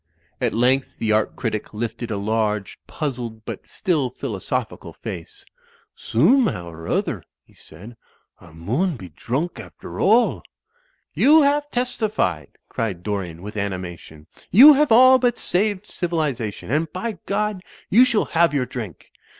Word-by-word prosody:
At 120 -3 0
length 130 +3 +1
the 110 - -1
art 110 0 +1
critic 110 -3 -4
lifted 120 +1 -4
a 105 - -2
large, 105 -1 -1
puzzled 120 -7 -5
but - - -7
still 155 -8 -1
philosophical 120 -6 -4
face. 85 -3 -9 0.5
"Soomehow 150 - +2
or 80 0 -10
other," - - -1 0.2
he - - -25
said, 100 +10 -13 0.4
"a' 85 - -16
mun 125 - -1
be 95 -7 -10
droonk 135 - -3
after - - -10
all." 225 +5 +3 0.7
"You 305 +2 +5
have 290 +1 +1
testified," 215 - -2
cried 95 -6 -4
Dorian 90 -5 -4
with 105 +1 -8
animation. 90 -6 -6 0.2
"You 275 +10 +9
have 290 -2 +2
all 255 +3 +7
but 245 -1 +1
saved 205 +1 0
civilization. 150 - -3
And 155 +2 0
by 220 +4 -5
Grod, 210 -1 -1 0.3
you 235 +6 +7
shall 240 -4 +2
have 165 -2 +2
your 130 -3 +1
drink." 110 - -8
125 Hz, 140 wpm, -22 LUFS, -, 0.7 s, You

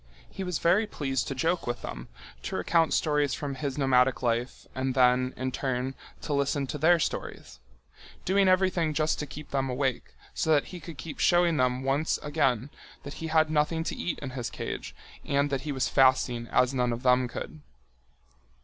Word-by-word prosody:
He 195 - -5
was 180 -3 -2
very 195 +8 +3
pleased 135 -9 -2
to 135 - -3
joke 165 +5 0
with 120 0 -3
them, - - -6 0.3
to - - -5
recount 165 -2 +2
stories 150 -2 +1
from 145 -2 -4
his 135 0 -4
nomadic 130 -2 +3
life 120 +1 -1
and 130 0 -2
then, 125 0 +4
in 130 +1 -2
turn, 130 0 -2 0.3
to 150 - -3
listen 140 0 0
their 160 +5 +3
stories—doing 165 - -3
everything 185 -4 +2
just 155 0 +1
to 150 - -4
keep 145 +3 -10
them 135 -1 0
awake, 130 0 -2 0.2
so 160 - 0
that 145 - +1
he 180 - -6
could 165 -3 -10
keep 150 +1 -8
showing 175 -2 +3
them 125 0 +1
once 140 +4 +1
again 135 -3 0 0.3
that 140 - -7
he 165 - -3
had 155 -1 +3
nothing 155 +2 +1
to - - -3
eat 175 - -3
in 135 - -5
his 125 -3 -4
cage - - -6 0.3
and 140 +1 0
that 135 -2 -1
he 150 - -4
was 130 -2 0
fasting 130 -3 +3
as 125 +3 +2
none 125 -2 +1
of 120 +2 -4
them 125 0 +4
could. 150 +5 -7
140 Hz, 185 wpm, -28 LUFS, 130-155 Hz, 0.3 s, then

